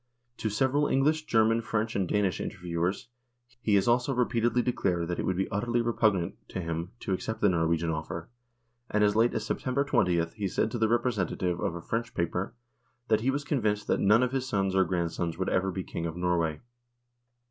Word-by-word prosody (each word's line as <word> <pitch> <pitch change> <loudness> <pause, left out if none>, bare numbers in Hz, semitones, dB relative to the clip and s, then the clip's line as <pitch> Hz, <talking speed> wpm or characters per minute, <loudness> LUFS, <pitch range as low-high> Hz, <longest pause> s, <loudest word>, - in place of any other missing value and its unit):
To 110 - -1
several 135 +7 +2
English, 155 +3 +2
German, 115 0 +3
French 110 -1 -2
and 95 -3 +1
Danish 100 -3 0
interviewers 90 +4 -3 0.5
he 105 -4 +2
has 100 +1 +3
also 125 +3 +2
repeatedly 120 -1 +1
declared 90 -8 0
that 90 - -2
it - - -1
would 95 - 0
be 95 - 0
utterly 120 +4 0
repugnant 110 -6 +1
to - - -4
him 85 0 -3
to 95 - -1
accept 110 +4 -3
the 105 - +4
Norwegian 85 -1 +1
offer, 80 +2 -4 0.6
and 105 0 +2
as 105 0 +3
late 115 +2 +3
as - - -2
September 135 +2 -1
2Oth 85 -10 +1
he 105 -2 -2
said 100 +4 0
to 120 - -3
the 110 -1 +2
representative 95 -7 0
of 85 - -1
a 85 - -6
French 115 +1 -3
paper, 90 +6 -2 0.5
that 110 0 +3
he 125 - +1
was 140 +2 0
convinced 110 -8 0
that - - +2
none 105 +5 +5
of 125 - 0
his 130 -1 -2
sons 95 -6 0
or 95 0 +4
grand 85 -2 -1
sons 85 -1 -3
would 95 - -1
ever 95 +1 +1
be 95 0 -3
King 85 -1 -4
of 80 +1 -6
Norway. 85 -3 0
100 Hz, 200 wpm, -29 LUFS, 90-120 Hz, 0.6 s, none